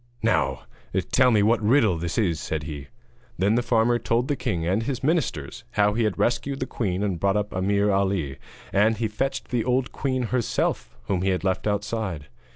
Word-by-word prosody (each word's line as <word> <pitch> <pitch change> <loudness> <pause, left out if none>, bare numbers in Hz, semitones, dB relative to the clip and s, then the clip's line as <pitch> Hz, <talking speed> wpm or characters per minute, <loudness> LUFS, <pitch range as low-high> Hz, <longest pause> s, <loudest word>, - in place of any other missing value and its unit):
'Now - - +1 0.5
tell 130 0 +5
me 105 -4 +4
what 110 +2 +3
riddle 110 -3 +4
this 85 +1 -3
is,' 90 -8 +1
said 80 -1 -3
he. 75 -2 -7 0.5
Then 100 +3 +2
the 120 - +2
farmer 120 0 +2
told 120 +2 0
the 145 - +2
king 85 -9 -2
and 95 +6 +1
his 125 +2 -3
ministers 135 - -1
how 105 0 +3
he 115 +1 +1
had 105 - -1
rescued 120 +3 0
the 130 - -1
queen 100 -6 -2
and 95 -5 -1
brought 100 +2 +2
up 105 0 -2
Ameer 100 +2 +1
Ali; 95 -8 0 0.4
and 105 +2 +3
he 110 +1 0
fetched 135 +6 -3
the 120 -2 0
old 125 +1 0
queen 130 -2 -1
herself, 125 -3 -1
whom 95 -3 -1
he 95 - +1
had 95 -1 0
left 95 +1 0
outside. 105 - -2
105 Hz, 195 wpm, -25 LUFS, 95-120 Hz, 0.5 s, tell